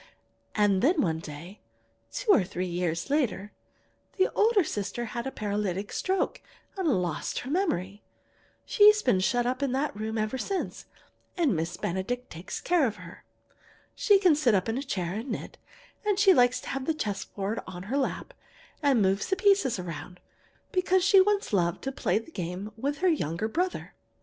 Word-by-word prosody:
"And 200 -2 +3
then 320 +5 +3
one 160 - +1
day, 165 +5 -10 0.5
two - - +1
or 225 - +5
three 180 0 -4
years 175 - -2
later, 225 -8 0 0.7
the 380 - +2
older 430 -2 +4
sister 215 -3 -3
had 235 +1 -3
a - - -3
paralytic 205 -3 -2
stroke 380 0 -1 0.3
and 380 -3 -1
lost 180 - -1
her 260 - -6
memory. 205 - -1 0.6
She's 425 +1 +6
been 185 - +3
shut 240 +6 +1
up 255 +2 -1
in 275 -3 0
that 275 0 -1
room 220 +1 -3
ever 215 +4 -1
since, 390 +7 -3 0.5
and 305 - +2
Miss 165 +2 -3
Benedict 215 +8 -3
takes 170 +4 -6
care 345 -6 +3
of 215 - -4
her. - - -12 0.7
She 415 -5 +4
can 370 -4 +5
sit 270 -7 +3
up 185 +1 0
in 225 +3 -1
a - - -3
chair 185 -11 -3
and 225 +6 -5
knit, 225 - -6 0.4
and 415 -2 +1
she 395 -1 +6
likes 245 -4 +4
to - - -8
have 270 +2 -3
a 320 - +1
chess 205 -9 -3
board 200 +3 -4
on 180 0 -7
her 240 +8 -2
lap, 270 - -3 0.5
and 270 -7 +3
move 195 +1 +1
the 380 - +2
pieces 385 - +3
around, 180 0 -7 0.5
because 370 -1 +2
she 390 -1 +7
once 405 - +1
loved 175 -3 +1
to 270 - -2
play 210 -8 0
the 225 +9 -6
game 180 - -5
with 280 +6 -2
her - - +6
younger 215 - 0
brother. 355 +10 -2
235 Hz, 180 wpm, -28 LUFS, -, 0.7 s, she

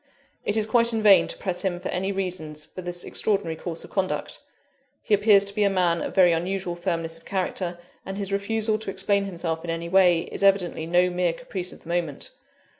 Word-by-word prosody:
It 205 - 0
is 215 - +3
quite 235 +1 +3
in 220 -1 -1
vain 200 -2 +7
to - - -4
press 185 -3 -2
him 180 -3 -1
for 185 - -5
any 190 +2 -1
reason 180 -5 -3
for 150 +4 -6
this 175 0 -3
extraordinary 195 -6 -1
course 165 0 -5
of - - -13
conduct 190 -2 -2 0.6
he 215 - 0
appears 205 -1 +5
to 200 0 -1
be 210 - +1
a 200 - +4
man 180 -3 +1
of - - -5
very 180 -3 +6
unusual 175 +1 -2
firmness 165 -2 -2
of 165 - -24
character; 185 -2 -2 0.3
and 195 0 -6
his 200 -1 -3
refusal 215 +2 0
to 220 - -6
explain 200 +1 0
himself 170 -3 -3
in 170 - -6
any 165 0 -3
way, 180 -2 +5
is - - -5
evidently 190 -5 +2
no 180 +1 +3
mere 175 -1 +1
caprice 185 -4 -5
of - - -14
the 165 - -13
moment. 170 -5 -3
185 Hz, 215 wpm, -25 LUFS, 170-200 Hz, 0.6 s, vain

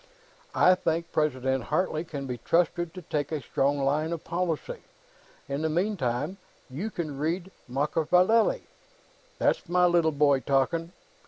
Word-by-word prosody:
I 180 - +6
think 170 -2 -1
President 130 -4 0
Hartley 170 -4 0
can 145 -5 -6
be 125 -2 -5
trusted 175 0 +1
to 185 - -8
take 145 -1 -2
a 155 - -1
strong 140 +1 0
line 145 +4 0
of 165 - -5
policy. 180 - -2 0.7
In 140 +1 -3
the 160 - 0
meantime, 160 - -1 0.3
you 175 +12 -3
can 155 -8 -5
read 170 +5 -2 0.2
Machiavelli." 170 - +2 0.7
"That's - - +1
my 180 0 +4
little 170 -2 +3
boy, 145 -2 +3
talking!" 140 +6 0
160 Hz, 140 wpm, -27 LUFS, 140-175 Hz, 0.7 s, I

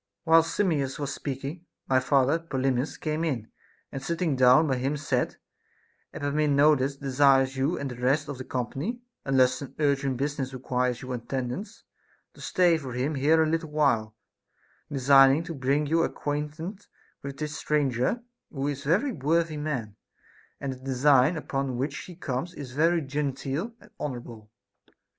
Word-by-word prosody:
8. 160 - -3
Whilst 165 0 +5
Simmias 145 -9 0
was 145 -1 -3
speaking, 140 +5 -5 0.2
my 130 -1 +4
father 135 +4 +2
Polymnis 135 -4 -1
came 155 +1 -2
in, 120 -9 -2 0.4
and 135 - -5
sitting 165 0 -1
down 130 +4 +6
by 135 -4 0
him 135 +4 -1
said: 140 -4 -1 0.7
Epaminondas 145 -1 +2
de 135 -1 -5
sires 135 -1 +4
you 135 +6 0
and 140 -2 -4
the 125 - -8
rest 140 +4 +2
of 140 -3 -6
the - - -4
company, 135 - -3 0.3
unless 130 -2 +4
some 140 - -9
urgent 140 -3 +1
business 135 -1 -2
requires 125 0 -1
your 130 0 -5
attendance, 125 - -4 0.5
to - - -15
stay 175 -3 +3
for 130 -4 -7
him 130 +5 -1
here 155 +4 +4
a - - +1
little 160 0 -1
while, 125 -8 +1 0.8
designing 135 +2 +5
to 165 0 -6
bring 140 +1 +1
you 165 +3 +2
acquainted 150 +7 -4 0.3
with 140 0 -7
this 150 -1 -4
stranger, 145 - 0 0.3
who 140 -1 -3
is 140 -1 -5
a - - -1
very 280 +5 -2
worthy 165 - 0
man; 140 -9 -3 0.6
and 135 -2 -3
the - - -11
design 135 +3 +3
upon 135 -4 -2
which 140 +3 -2
he 180 - -11
comes 160 +2 -4
is 135 -4 -7
very 165 +5 +2
genteel 140 - -3
and 210 - -19
honorable. 120 -6 -6
140 Hz, 160 wpm, -27 LUFS, 130-155 Hz, 0.8 s, down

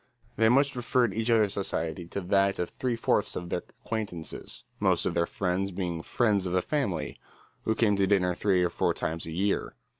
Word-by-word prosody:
They 110 +1 +4
much 140 +3 +4
preferred 120 -2 +1
each 115 +3 -1
other's 110 -3 +4
society 85 -3 -2
to 100 - -4
that 95 +1 +2
of 90 - -2
three 125 -2 -1
fourths 115 - +1
of 90 -1 -5
their - - -1 0.2
acquaintances, 100 -8 -4 0.2
most - - +2
of - - 0
their 85 0 +1
friends 95 +1 -1
being 90 -3 -3
"friends 105 -1 +1
of 90 - -3
the 90 -1 +2
family," 100 - -2 0.5
who 110 - +1
came 110 -3 +3
to 100 -1 +3
dinner 90 -2 +3
three 90 0 +2
or 90 - +1
four - - +1
times 80 +1 -3
a - - -5
year. 95 +5 -1
95 Hz, 200 wpm, -28 LUFS, 90-110 Hz, 0.5 s, They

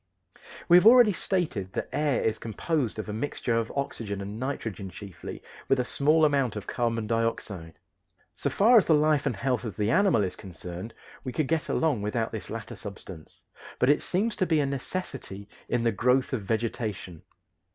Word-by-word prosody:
We 175 - +8
have 180 - +6
already 240 -3 +8
stated 155 - -2
that - - -3
air 150 -2 +1
is 110 - 0
composed 120 +2 -2
of 110 - -5
a 105 - -4
mixture 120 0 -2
of 115 -1 -1
oxygen 115 -8 -3
and 100 +2 -6
nitrogen 115 -7 -4
chiefly, 95 0 -9 0.2
with 135 - +3
a 125 - +1
small 155 +5 +3
amount 140 -6 +1
of 105 - -5
carbon 115 -2 -1
dioxide. 105 -7 -2 0.6
So - - -1
far 230 +4 +6
as 195 - -1
the 160 - +5
life 150 -1 +2
and 120 - 0
health 125 +4 -1
of 110 -6 -6
the 105 +1 +1
animal 185 - +4
is 95 - -3
concerned 90 +3 -8 0.3
we 130 - -4
could 140 +3 -1
get 160 +1 -1
along 150 -9 +1
without 110 +2 -1
this 110 -4 -6
latter 115 0 -6
substance, 95 -5 -10 0.3
but 125 - +4
it 150 - +2
seems 210 +5 0
to 185 - +1
be 160 -2 +3
a 145 - +2
necessity 135 - -5 0.2
in 120 -1 +1
the 115 - +3
growth 125 +6 +2
of 125 - -1
vegetation. 105 -5 -3
120 Hz, 185 wpm, -27 LUFS, 105-150 Hz, 0.6 s, We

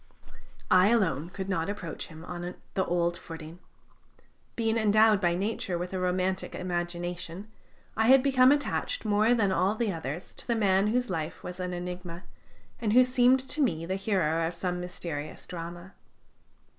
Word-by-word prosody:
I 185 +1 +7
alone 175 - +1
could 190 +1 -6
not 170 -2 -1
approach 185 -6 -5
him 160 +1 -11
on 175 0 -6 0.2
the 190 - +1
old 175 0 +1
footing. 165 0 -9 1.0
Being 225 -1 0
endowed 215 -1 +4
by 175 -2 +2
nature 195 -2 -2
with 180 +2 -5
a 185 - -1
romantic 185 +1 -1
imagination, 175 +2 -4 0.4
I 220 0 +2
had 260 +1 +7
become 260 -1 +5
attached 290 +11 -1
more 215 +3 +3
than 205 -5 +2
all 190 +2 +2
the 220 -3 -1
others 160 +1 -6
to - - -11
the 235 - +1
man 195 -2 +3
whose 245 0 0
life 160 -2 -4
was 180 +1 -7
an 180 0 -3
enigma, 180 0 -6 0.6
and 215 -2 0
who 255 +2 +8
seemed 255 +1 +4
to 305 - 0
me 165 - +1
the 185 - -2
hero 165 -5 +1
of 170 - -5
some 180 0 -2
mysterious 170 -4 -6
drama. 175 +2 -8
185 Hz, 165 wpm, -28 LUFS, 175-215 Hz, 1.0 s, who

